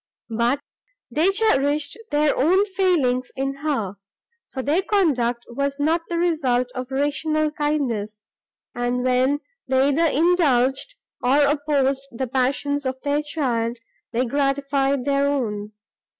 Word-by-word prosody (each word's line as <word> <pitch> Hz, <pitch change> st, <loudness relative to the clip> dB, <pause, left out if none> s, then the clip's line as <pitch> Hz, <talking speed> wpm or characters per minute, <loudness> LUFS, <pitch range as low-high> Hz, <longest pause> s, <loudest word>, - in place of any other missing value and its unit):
But 240 Hz, +5 st, +1 dB, 0.5 s
they 320 Hz, +5 st, +3 dB
cherished 300 Hz, -8 st, +1 dB
their 295 Hz, 0 st, +2 dB
own 370 Hz, +9 st, +3 dB
failings 345 Hz, -11 st, +1 dB
in 275 Hz, +1 st, -2 dB
her; 265 Hz, -10 st, -2 dB, 0.5 s
for 260 Hz, -, -5 dB
their 305 Hz, +7 st, +2 dB
conduct 265 Hz, -, +1 dB
was 280 Hz, +3 st, -2 dB
not 320 Hz, +3 st, +2 dB
the 340 Hz, -, -1 dB
result 265 Hz, -8 st, +1 dB
of 255 Hz, -1 st, -5 dB
rational 300 Hz, +3 st, 0 dB
kindness, 240 Hz, -9 st, -2 dB, 0.5 s
and, 245 Hz, +1 st, -1 dB
when 255 Hz, +3 st, +2 dB, 0.3 s
they 265 Hz, +1 st, +3 dB
either 315 Hz, +4 st, +2 dB
indulged, 300 Hz, -, +2 dB, 0.3 s
or 275 Hz, +4 st, +4 dB
opposed 280 Hz, -2 st, 0 dB
the 240 Hz, +3 st, -3 dB
passions 275 Hz, +3 st, 0 dB
of 260 Hz, 0 st, -3 dB
their 290 Hz, +1 st, +1 dB
child, 245 Hz, -6 st, -1 dB, 0.3 s
they 245 Hz, +2 st, 0 dB
gratified 275 Hz, 0 st, 0 dB
their 280 Hz, 0 st, +2 dB
own. 215 Hz, -7 st, -2 dB
275 Hz, 125 wpm, -23 LUFS, 255-300 Hz, 0.5 s, or